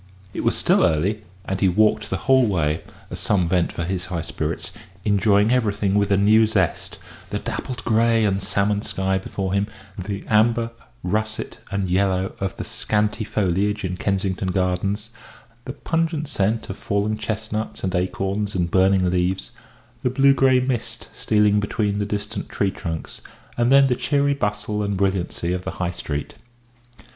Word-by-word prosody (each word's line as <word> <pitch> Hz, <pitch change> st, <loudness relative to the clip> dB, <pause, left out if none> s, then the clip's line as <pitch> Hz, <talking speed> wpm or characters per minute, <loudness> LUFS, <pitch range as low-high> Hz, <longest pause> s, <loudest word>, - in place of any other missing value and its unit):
It -, -, -3 dB
was -, -, +1 dB
still -, -, +3 dB
early, 90 Hz, +5 st, +1 dB, 0.2 s
and 95 Hz, 0 st, -2 dB
he 95 Hz, -, +5 dB
walked 105 Hz, +2 st, +2 dB
the 95 Hz, -, -1 dB
whole 130 Hz, -2 st, +5 dB
way, 80 Hz, -5 st, 0 dB, 0.3 s
as -, -, -5 dB
some 95 Hz, -5 st, +1 dB
vent 90 Hz, 0 st, +1 dB
for 85 Hz, -, -4 dB
his 90 Hz, +1 st, -2 dB
high 85 Hz, -4 st, -3 dB
spirits, -, -, -3 dB, 0.3 s
enjoying 105 Hz, +1 st, +3 dB
everything 105 Hz, -5 st, +1 dB
with 100 Hz, -1 st, +2 dB
a 100 Hz, -, +4 dB
new 110 Hz, +3 st, +5 dB
zest 100 Hz, -5 st, -1 dB, 0.3 s
the -, -, -2 dB
dappled 120 Hz, -4 st, -5 dB
grey 115 Hz, 0 st, +3 dB
and 100 Hz, -1 st, +1 dB
salmon 100 Hz, +2 st, +1 dB
sky 95 Hz, -2 st, -1 dB
before 95 Hz, 0 st, -3 dB
him, 100 Hz, +1 st, +1 dB, 0.3 s
the 100 Hz, +2 st, -4 dB
amber, 115 Hz, +2 st, +3 dB, 0.3 s
russet, 110 Hz, +4 st, -2 dB
and 100 Hz, -1 st, -1 dB
yellow 95 Hz, 0 st, +1 dB
of 95 Hz, -1 st, -2 dB
the -, -, -5 dB
scanty 105 Hz, +1 st, 0 dB
foliage 105 Hz, 0 st, 0 dB
in 90 Hz, 0 st, -2 dB
Kensington 95 Hz, 0 st, -1 dB
Gardens, 95 Hz, +4 st, -1 dB, 0.5 s
the 130 Hz, -, -5 dB
pungent 165 Hz, 0 st, -1 dB
scent 110 Hz, -4 st, 0 dB
of 95 Hz, -, -7 dB
fallen 100 Hz, +1 st, -1 dB
chestnuts 110 Hz, 0 st, -4 dB
and 95 Hz, -1 st, -1 dB
acorns 95 Hz, +3 st, -1 dB
and 85 Hz, -2 st, 0 dB
burning 95 Hz, 0 st, +4 dB
leaves, 90 Hz, +1 st, 0 dB, 0.5 s
the 125 Hz, -, +1 dB
blue 135 Hz, +2 st, +5 dB
grey 130 Hz, -1 st, +4 dB
mist 125 Hz, -2 st, -3 dB
stealing 105 Hz, -1 st, +3 dB
between 105 Hz, 0 st, -1 dB
the 100 Hz, -, -1 dB
distant 105 Hz, 0 st, -4 dB
tree 100 Hz, -1 st, 0 dB
trunks, 80 Hz, -2 st, -6 dB, 0.3 s
and 120 Hz, +1 st, +2 dB
then 140 Hz, 0 st, +7 dB
the 125 Hz, -2 st, +2 dB
cheery 140 Hz, +2 st, +1 dB
bustle 105 Hz, -4 st, -2 dB
and 100 Hz, -1 st, -1 dB
brilliancy 95 Hz, -2 st, 0 dB
of 90 Hz, 0 st, -3 dB
the -, -, -4 dB
High 90 Hz, -1 st, -1 dB
Street. 75 Hz, -4 st, -4 dB
100 Hz, 165 wpm, -22 LUFS, 95-110 Hz, 0.5 s, then